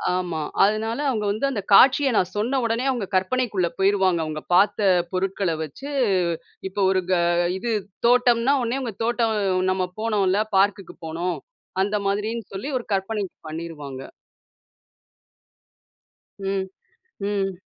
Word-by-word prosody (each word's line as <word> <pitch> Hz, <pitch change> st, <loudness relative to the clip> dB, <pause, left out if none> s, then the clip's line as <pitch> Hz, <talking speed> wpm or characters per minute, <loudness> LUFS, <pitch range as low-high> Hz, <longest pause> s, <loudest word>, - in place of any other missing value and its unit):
ஆமா. 175 Hz, -3 st, -2 dB, 0.2 s
அதனால 220 Hz, +5 st, +1 dB
அவுங்க 215 Hz, -5 st, -1 dB
வந்து 215 Hz, +6 st, -1 dB
அந்த 205 Hz, -6 st, -2 dB
காட்சிய 275 Hz, +4 st, +7 dB
நான் 180 Hz, -, +1 dB
சொன்ன 250 Hz, +6 st, +1 dB
உடனே, 230 Hz, +2 st, 0 dB
அவுங்க 240 Hz, -6 st, -1 dB
கற்பனைக்குள்ள 195 Hz, -2 st, +1 dB
போயிருவாங்க. 190 Hz, -3 st, +3 dB
அவுங்க 155 Hz, 0 st, -5 dB
பாத்த 200 Hz, +4 st, +4 dB, 0.3 s
பொருட்கள 190 Hz, -1 st, -1 dB
வச்சு, 270 Hz, -, -8 dB, 0.8 s
இப்போ 200 Hz, +1 st, -3 dB
ஒரு 185 Hz, -1 st, +2 dB
க -, -, +5 dB, 0.4 s
இது 235 Hz, +4 st, -3 dB, 0.4 s
தோட்டம்ன்னா, 245 Hz, +1 st, +4 dB
உடனே 240 Hz, +4 st, -1 dB
அவுங்க 235 Hz, -6 st, -5 dB
தோட்டம் 230 Hz, -1 st, +1 dB, 0.4 s
நம்ம 185 Hz, -1 st, 0 dB, 0.2 s
போனோம்ல! 205 Hz, -3 st, +2 dB, 0.2 s
பார்க்குக்கு 195 Hz, -1 st, +1 dB
போனோம். 170 Hz, +3 st, -2 dB, 0.5 s
அந்த 205 Hz, +1 st, -1 dB
மாதிரின்னு 210 Hz, +2 st, -2 dB
சொல்லி, 215 Hz, +10 st, -4 dB
ஒரு -, -, -10 dB
கற்பனை 200 Hz, +2 st, -1 dB, 0.3 s
பண்ணிருவாங்க. 150 Hz, -5 st, -7 dB, 2.4 s
ம், 195 Hz, -1 st, -2 dB, 0.6 s
ம். 195 Hz, -2 st, -2 dB
200 Hz, 120 wpm, -23 LUFS, 185-230 Hz, 2.4 s, காட்சிய